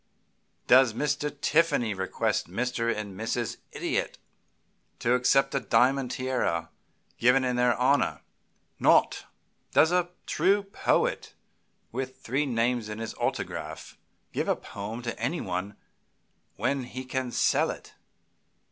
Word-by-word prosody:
Does 130 -3 +6
Mr. 150 +1 0
Tiffany 150 -8 +2
request 95 -2 -1
Mr. 115 +3 -1
and 105 -3 -4
Mrs. 115 +2 -2
Idiot - - -2 0.8
to 120 - +1
accept 135 +2 +3
a 140 - +2
diamond 125 +3 +2
tiara 130 0 -1 0.5
given 125 +3 +4
in 125 -1 0
their 125 -1 +3
honor? 135 +3 +2 0.6
Not. - - +4 0.5
Does 160 - +5
a 180 -1 +2 0.2
true 195 +5 +2
poet, 195 - 0 0.6
with 130 +2 -4
three 140 +5 -1
names 120 -2 0
on 105 - -5
his 115 0 -5
autograph, - - -4 0.4
give - - -1
a - - +2
poem 110 +4 -7
to 115 -1 -3
anybody 105 - -2 0.8
when 140 -2 -1
he 130 +1 -7
can 130 -1 -3
sell - - +2
it? - - -8
125 Hz, 120 wpm, -27 LUFS, 115-135 Hz, 0.8 s, Does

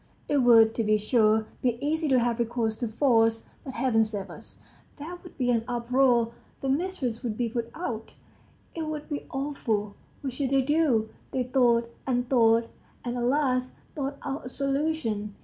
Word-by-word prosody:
It 290 - +2
would, 230 -4 +6
to 230 - -1
be 215 0 +3
sure, 215 0 +3 0.2
be 245 -2 +1
easy 310 +3 0
to 265 -2 +4
have 240 -1 +1
recourse 230 -1 0
to 240 - -2
force. 225 -2 +2 0.2
But 265 - -7
Heaven 235 -2 +3
save 210 -3 -4
us! - - -10 0.4
There 320 +4 -7
would 355 - -14
be 245 -2 +1
an 230 -2 +1
uproar, 240 -1 +2 0.3
the 270 - -1
mistress 275 -6 -1
would 230 -4 -3
be 240 -2 0
put 235 0 -3
out 235 -10 -5 0.6
it 320 -2 -4
would 305 0 -5
be 290 -2 -4
awful! 230 -7 -2 0.3
What 270 -3 -3
should 265 0 -1
they 270 0 +3
do? 270 -7 +2 0.2
They 255 - -1
thought 235 -2 +2
and 245 -1 0
thought, 230 -2 +4 0.4
and 240 0 -2
at 245 - -2
last 255 -1 +1 0.2
thought 280 -1 -3
out 280 -1 -4
a - - -5
solution. 275 -7 -1
245 Hz, 180 wpm, -27 LUFS, 225-275 Hz, 0.6 s, would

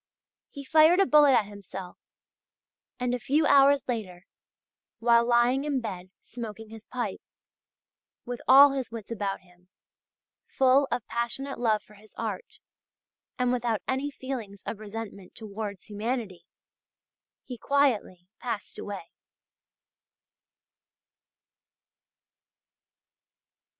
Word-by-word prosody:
He 280 - -9
fired 320 +5 +5
a 390 - +5
bullet 295 -4 +6
at 225 -4 +4
himself, 195 -2 -9 1.0
and, 250 0 -1
a 250 - -1
few 295 +6 +1
hours 280 0 +5
later, 190 -7 -4 0.7
while 235 0 +4
lying 245 +3 +3
in 290 -3 0
bed 185 -6 -6
smoking 225 -2 -8
his 225 -1 -12
pipe, 240 -6 -4 1.0
with 245 0 -5
all 275 +2 +9
his 270 -2 -3
wits 225 -1 -9
about 200 -3 -3
him, 180 0 -25 0.8
full 270 +1 +3
of 240 - -2
passionate 240 +4 -3
love 215 -4 +1
for 210 - -19
his 210 +1 -19
art, - - -5 0.8
and 250 -1 +1
without 235 -3 -1
any 265 +2 -1
feelings 245 -8 -7
of 215 - -5
resentment 210 -3 -8
towards 205 -2 -7
humanity, 215 -2 -4 1.0
he 250 -3 -8
quietly 225 -11 +1
passed 235 -4 -5
away." 200 -4 -7
235 Hz, 110 wpm, -27 LUFS, 205-265 Hz, 1.0 s, all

